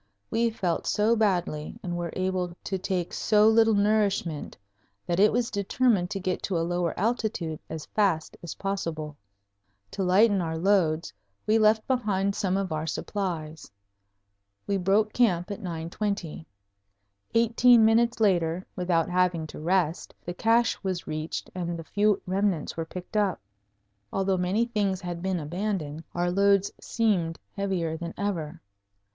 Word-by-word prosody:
We 230 +1 +2
felt 185 -6 -2
so 215 +3 +3
badly 175 -8 0
and 175 -1 -3
were 175 -1 -3
able 185 -2 -1
to 190 - -2
take 180 -2 -2
so 210 0 +4
little 225 0 +5
nourishment 200 -6 0 0.5
that 175 +1 -1
it 210 +2 +6
was 240 0 0
determined 200 -2 +1
to 195 -1 -3
get 185 -1 -2
to 185 - -1
a 165 - 0
lower 175 -1 -1
altitude 210 -7 -1
as 160 -1 -6
fast 190 -7 0
as 170 - -7
possible. 165 -6 -3 0.8
To - - -4
lighten 195 +2 +4
our 160 -1 -2
loads 170 -3 +1 0.3
we 220 +1 +3
left 215 0 +4
behind 200 -6 0
some 195 -2 0
of 195 -3 -2
our 155 +1 -2
supplies. 160 -3 -4 1.0
We 200 - 0
broke 200 +3 +2
camp 195 -6 +2
at 200 - -5
9:20. 170 -1 -4 0.9
Eighteen 235 0 +5
minutes 230 +1 +3
later, 180 -4 +2
without 175 -2 +1
having 180 -2 +1
to 155 - -9
rest, 170 0 0
the 175 - -4
cache 230 +5 +2
was 185 -2 -2
reached 155 +1 -4
and 175 -2 -3
the 165 - -7
few 205 +4 +2
remnants 190 -3 0
were 165 - -3
picked 180 +5 -9
up. 205 -3 +1 0.7
Although 195 -1 +1
many 185 +6 +1
things 205 -5 -1
had 175 -1 -5
been 185 -1 -1
abandoned, 165 -1 -3
our 175 0 +1
loads 200 +1 +3
seemed 190 -8 0 0.2
heavier 180 -5 -1
than 170 0 -6
ever. 170 -5 -3
185 Hz, 150 wpm, -27 LUFS, 170-210 Hz, 1.0 s, it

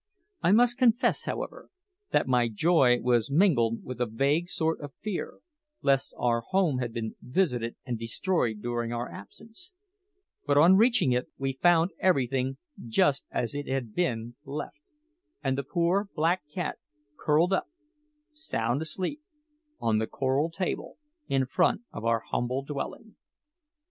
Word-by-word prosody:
I 175 - +3
must 240 +3 +4
confess, 245 0 +3
however, - - -5 0.4
that - - +2
my 125 -2 +3
joy 125 0 +4
was 120 -2 +2
mingled 140 - +3
with 125 -1 -6
a 125 - +2
vague 140 +10 +1
sort 160 -2 -1
of 145 -2 -8
fear 210 +2 -5 0.4
lest 135 -1 +2
our 120 -1 +1
home 175 -2 +1
had 120 -2 -2
been 115 -1 -5
visited 125 -6 0
and 120 -4 -3
destroyed 115 - -1
during 120 -1 -2
our 120 0 -3
absence; 225 - -13 0.7
but 145 0 +3
on 170 +6 +7
reaching 230 - +4
it 125 0 0
we 135 0 -2
found 170 +5 +3
everything 135 -6 +1 0.3
just 135 +5 +2
as 120 - -2
it 145 0 -4
had 130 -5 -2
been 120 -9 -1
left, 145 0 -6 0.6
and 135 -2 +1
the 140 - -1
poor 175 +7 0
black 170 +4 +2
cat 175 -1 -3 0.4
curled 160 +6 +2
up, 190 - 0 0.6
sound 140 - -1
asleep, 185 - -3 0.6
on 110 -1 +1
the 110 - -1
coral 135 +4 0
table 180 +2 -4 0.3
in 135 -1 +1
front 180 - +2
of - - -6
our 115 -1 +2
humble 125 +4 -2
dwelling. 145 +10 -6
140 Hz, 145 wpm, -28 LUFS, 120-175 Hz, 0.7 s, on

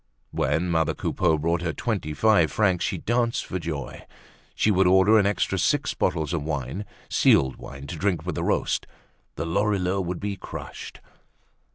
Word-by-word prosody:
When 80 +6 0
mother 80 -1 +1
Coupeau 80 -4 +1
brought 85 +2 0
her 85 -1 -2
twenty 100 -10 -3
five 105 -5 +4
francs, 95 0 +2
she - - -1
danced 120 0 0
for 95 - -4
joy. 80 -5 -6 0.5
She 110 - +2
would 95 -1 +3
order 95 +4 +6
an 100 - +3
extra 100 - 0
six - - +1
bottles 80 -2 -1
of 85 - -1
wine, 70 +5 -4 0.2
sealed 65 -1 +3
wine 70 +1 -9
to 80 - -6
drink 95 0 -1
with - - -2
the - - -3
roast. - - 0 0.5
The - - -3
Lorilleuxs 95 0 0
would 90 0 -3
be 100 -1 -3
crushed. - - -8
90 Hz, 170 wpm, -25 LUFS, 80-100 Hz, 0.5 s, order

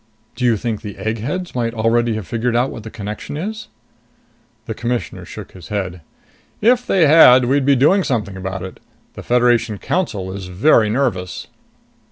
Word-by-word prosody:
"Do 125 - -2
you 115 -3 +3
think 110 -1 -3
the 105 -3 -8
eggheads 125 - -3
might 120 -2 -2
already 115 +1 +1
have 110 -3 -5
figured 120 +3 -1
out 125 +3 +1
what 115 - -8
the 110 - -9
connection 105 +5 -6
is?" 215 +7 -5 1.0
The - - -4
Commissioner 120 0 -4
shook - - -10
his 90 -3 -12
head. 95 -4 -4 0.6
"If 245 +3 +3
they 185 -4 +4
had, 130 -5 +7
we'd 135 +2 +1
be 140 - +5
doing 165 +10 +4
something 110 - -2
about 95 0 -5
it. 95 - -9 0.3
The - - -9
Federation 120 -3 +2
Council 100 - -2
is 95 -2 -7
very 105 +4 +3
nervous!" 110 -7 -2
115 Hz, 170 wpm, -19 LUFS, 105-135 Hz, 1.0 s, had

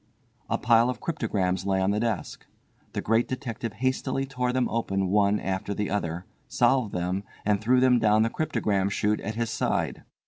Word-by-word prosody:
A - - +1
pile 115 +1 +4
of 125 - -3
cryptograms 105 - -1
lay 95 -1 +2
on 95 +1 +2
the 105 - 0
desk. 115 -4 -3 0.5
The - - -3
Great 115 +2 +2
Detective 115 -4 -4
hastily 130 +3 -1
tore 125 -2 -1
them 125 -1 +1
open 95 -5 -1
one 100 +1 +3
after 95 +1 -3
the 105 -1 -2
other, 90 -3 -2 0.2
solved 120 -3 +2
them, 90 +2 -2 0.2
and 105 -1 +2
threw 125 +4 +3
them 125 -1 +4
down 110 0 +4
the 115 - 0
cryptogram 100 -10 0
shute 105 +1 0
at 110 +1 -4
his 115 0 -2
side. - - -1
110 Hz, 180 wpm, -26 LUFS, 100-125 Hz, 0.5 s, pile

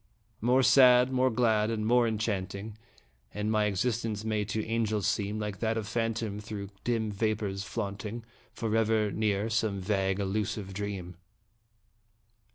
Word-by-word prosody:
More 125 +4 +4
sad, 125 -1 +6
more 130 0 +3
glad, 110 -3 +2
and 110 -2 -2
more 120 +1 +4
enchanting 105 -1 -3 0.6
And 105 +1 -1
my 110 -1 +2
existence 105 +1 -1
may 110 -1 0
to 110 +1 -2
angels 110 -3 0
seem 105 -1 0
Like 105 -2 -4
that 115 0 0
of 110 -2 -3
phantom 115 -2 -2
through 105 -1 -6
dim 115 -3 0
vapors 105 -2 -1
flaunting, 105 +1 -5 0.3
Forever 110 -1 +1
near 105 -1 0
some 110 -3 0
vague, 95 0 0
elusive 100 0 -2
dream. 95 -3 -5
110 Hz, 135 wpm, -29 LUFS, 100-115 Hz, 0.6 s, sad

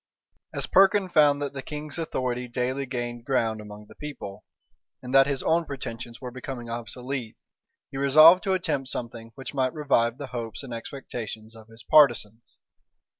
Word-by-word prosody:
As - - -1
Perkin 195 0 +4
found 145 -3 +4
that 140 - -4
the 135 - -5
king's 150 +2 -6
authority 125 -6 -2
daily 130 +3 -2
gained 120 -2 -4
ground 115 -4 0
among 105 0 -11
the - - -16
people, 140 -10 -8 0.6
and 125 +1 -8
that 135 0 +7
his 140 -2 -1
own 170 +1 +2
pretensions 120 -5 -6
were 125 -1 -7
becoming 125 -2 -7
obsolete, 120 +1 -5 0.5
he 135 - -6
resolved 155 +6 +8
to 190 - +2
attempt 155 -8 -1
something 115 -2 -6
which 135 +1 -7
might 130 0 0
revive 125 -6 +1
the 145 - -6
hopes 115 +1 -4
and 130 -3 -7
expectations 115 -2 -7
of 110 -1 -14
his 115 +1 -13
partisans. 120 -6 +3
130 Hz, 165 wpm, -26 LUFS, 115-145 Hz, 0.6 s, resolved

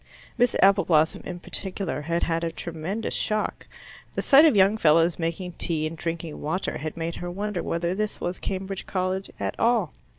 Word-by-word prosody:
Miss 245 -1 +2
Appleblossom 180 -5 +4
in 175 -1 -5
particular 185 -8 -2
had 170 +3 -1
had 165 0 0
a 165 - -1
tremendous 170 +8 -4
shock. 215 0 -2 0.5
The - - -1
sight 285 +3 +7
of 310 - +5
young 195 +2 +5
fellows 165 -2 +3
making 170 +2 -2
tea 155 -2 0
and 155 +1 -4
drinking 165 -1 -4
water 160 +6 -2
had 155 +2 -5
made 165 0 -3
her 175 - -5
wonder 200 +1 -3
whether 170 +1 -1
this 215 +2 -2
was 175 +1 -3
Cambridge 195 0 -4
College 185 0 -2
at - - -2
all. 235 +1 +2
175 Hz, 175 wpm, -25 LUFS, 165-195 Hz, 0.5 s, sight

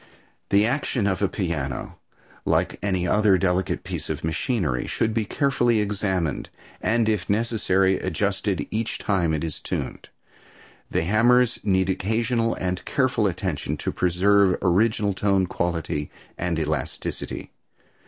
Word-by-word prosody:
The 100 +1 +4
action 125 -2 0
of 95 -2 0
a 100 - +3
piano, 75 -10 -3 0.4
like - - +1
any 95 -3 0
other 105 +1 +4
delicate 90 -1 0
piece - - -5
of - - -3
machinery, 80 - -1
should 110 0 0
be 110 -1 0
carefully 120 -2 +2
examined, 95 -6 -1 0.3
and, 115 0 +2
if 105 -6 0
necessary, 100 -3 +2
adjusted 95 -2 -1
each 110 +1 -2
time 90 -5 +1
it 80 -1 -1
is 80 -3 -4
tuned. - - -5 0.8
The - - 0
hammers 120 +6 +3
need 95 -2 +2
occasional 115 +4 0
and 90 0 -3
careful 130 -5 +1
attention 90 -3 -2
to - - -2
preserve 95 +2 +3
original 100 +2 +2
tone 95 -1 +2
quality 85 -4 -2 0.3
and 85 -2 -2
elasticity. 80 -1 -3
95 Hz, 130 wpm, -24 LUFS, 90-110 Hz, 0.8 s, The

